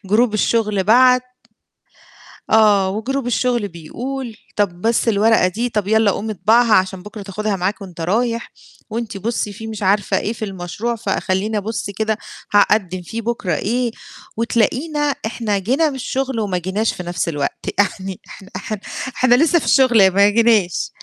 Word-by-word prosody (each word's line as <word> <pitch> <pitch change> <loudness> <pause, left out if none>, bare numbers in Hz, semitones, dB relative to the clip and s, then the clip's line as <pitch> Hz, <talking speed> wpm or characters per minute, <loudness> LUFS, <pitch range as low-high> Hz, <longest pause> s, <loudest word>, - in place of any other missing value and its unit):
group 230 0 +4
الشغل 215 -2 +1
بَعَت 250 +3 +5 1.3
آه، 205 -3 +4
و 210 +3 -3
group 275 -2 -1
الشغل 245 -3 0
بيقول، 235 +9 -6 0.2
طَب 180 -4 -1
بس 230 +1 +1
الورقة 220 -2 +4
دي، 230 +7 -2
طَب 210 -3 -2
يالّا 220 -1 +3
قُوم 215 +3 -4
اطبعها 220 +2 +3
عشان 190 -1 +1
بُكرة 210 0 -9
تاخدها 205 +1 -3
معاك 190 +3 -2
وأنت 175 -4 -9
رايح، 230 +6 -1 0.4
وأنتِ 225 -2 -4
بُصّي 215 0 -2
فيه 220 +2 -8
مش 215 -2 -6
عارفة 200 +1 +2
إيه 220 - -2
في 220 - -5
المشروع 195 +5 -4
فخلّيني 205 0 -1
أبُصّ 210 0 -3
كده 215 +2 -1 0.4
هاقدِّم 195 -3 +3
فيه 225 +6 -6
بُكرة 230 -5 -2
إيه، 240 +2 -1 0.5
وتلاقينا 250 +7 0 0.3
إحنا 220 -2 -1
جينا 270 - +1
من 275 - -6
الشغل 265 -1 -2
وما 200 -4 -1
جيناش 190 +5 -1
في 180 - -7
نفْس 175 0 -2
الوقت، 145 -3 -3
يعني 190 -2 -1
إحنا 195 - -12
إحنا 215 -2 -4 0.4
إحنا 250 -1 +4
لسه 325 +6 +4
في - - -6
الشغل 235 -8 +5
ما 200 +2 +5
جيناش. 215 -5 +2
215 Hz, 160 wpm, -19 LUFS, 195-235 Hz, 1.3 s, بَعَت